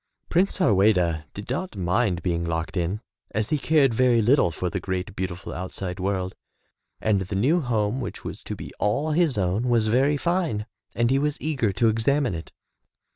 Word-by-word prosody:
Prince 185 +4 +2
Harweda 95 - +3
did 100 - -7
not 160 +2 -3
mind 90 0 0
being 85 -2 0
locked 80 +1 -3
in, 90 +4 -1 0.3
as 110 -1 -1
he 150 - +2
cared 140 -4 +3
very 125 0 +4
little 115 -2 +4
for 85 +3 -3
the 85 - -2
great 95 +1 -4
beautiful 90 -1 -4
outside 90 +1 -5
world, 95 -1 -1 0.7
and 105 -3 +1
the 95 +1 -4
new 145 - +3
home 115 -1 0
which - - -6
was - - -6
to - - -4
be - - -8
all 140 +10 +1
his 155 -5 +2
own 100 +6 0
was 115 -2 +3
very 135 +6 +3
fine, 170 - 0 0.3
and 120 +1 +2
he 135 - +3
was 150 +1 -1
eager 135 -9 0
to 115 +5 +2
examine 120 +3 +2
it. 80 0 -7
110 Hz, 180 wpm, -25 LUFS, 95-135 Hz, 0.7 s, very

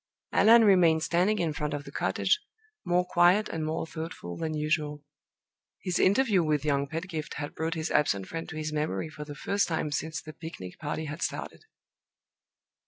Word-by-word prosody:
Allan 230 +1 +7
remained 175 -6 +5
standing 185 +6 +2
in 165 -5 0
front 150 0 -2
of 145 - -5
the - - -10
cottage, 425 - +1 0.4
more 180 +1 +2
quiet 180 +4 +4
and 160 -1 -3
more 155 +1 -2
thoughtful 160 - -6
than 155 - -3
usual. 150 -1 -1 0.8
His 180 -2 0
interview 205 -1 +4
with 150 -2 0
young 140 -1 +1
Pedgift 160 0 -5
had 145 -1 -5
brought 165 +2 -2
his 160 +1 -3
absent 100 -10 +2
friend 165 0 -5
to 160 - -7
his 155 0 -3
memory 150 -4 -1
for 150 -1 -8
the 145 -1 -8
first 200 +6 0
time 160 -2 -1
since 155 0 -2
the 155 +1 -10
picnic 95 - -9
party 155 +1 -3
had 150 +3 -6
started. - - -4
160 Hz, 175 wpm, -28 LUFS, 150-175 Hz, 0.8 s, Allan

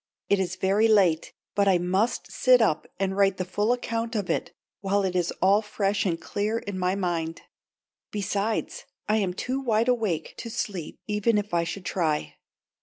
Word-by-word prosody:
It 200 - +4
is 185 -1 -1
very 195 +4 +3
late, 190 -7 +3 0.2
but 200 -1 +2
I 190 -2 +5
must 185 +6 0
sit 255 -1 +5
up 185 -9 +1
and 190 0 0
write 195 -1 +3
the 185 - -2
full 205 +5 0
account 230 -1 -2
of 205 -4 -1
it - - -2 0.3
while 200 0 +1
it 185 -1 -1
is 175 -1 +1
all 200 +3 +5
fresh 205 -1 0
and 165 -2 -1
clear 210 +3 -2
in 200 -4 -5
my 180 +1 +1
mind. 170 -4 -2 0.7
Besides 205 +1 -2 0.2
I 215 +1 +3
am 190 -4 0
too 255 +6 -2
wide 230 -2 +1
awake 215 -10 0
to 230 - -6
sleep 190 -7 -4
even 210 +1 +1
if 205 -2 -3
I 170 -1 +3
should 175 +2 -6
try. 155 -5 -1
200 Hz, 180 wpm, -26 LUFS, 180-215 Hz, 0.7 s, I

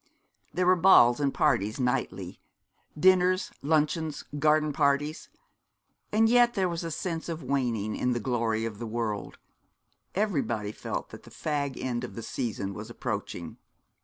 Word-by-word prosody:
There 180 - 0
were 185 +1 +6
balls 155 -9 +6
and 140 -1 +1
parties 115 -7 +1
nightly, 100 -8 -2 0.6
dinners, 185 +1 +4
luncheons, 155 +1 0 0.2
garden 155 0 +3
parties; 145 +1 0 0.8
and 220 +1 +4
yet 240 +1 +4
there 190 -3 +2
was 170 -1 -3
a 165 - -3
sense 165 +1 -4
of 165 -2 -4
waning 120 -6 -1
in 125 - 0
the 120 - -1
glory 115 -2 0
of 110 -2 -5
the 120 - -4
world 110 -2 -3 0.8
everybody 140 - 0
felt - - -5
that - - -11
the - - -15
fag 145 -3 -3
end 125 -1 -2
of 125 - -7
the 115 - -6
season 105 -6 -3
was - - -8
approaching. - - -5
140 Hz, 150 wpm, -28 LUFS, 115-165 Hz, 0.8 s, were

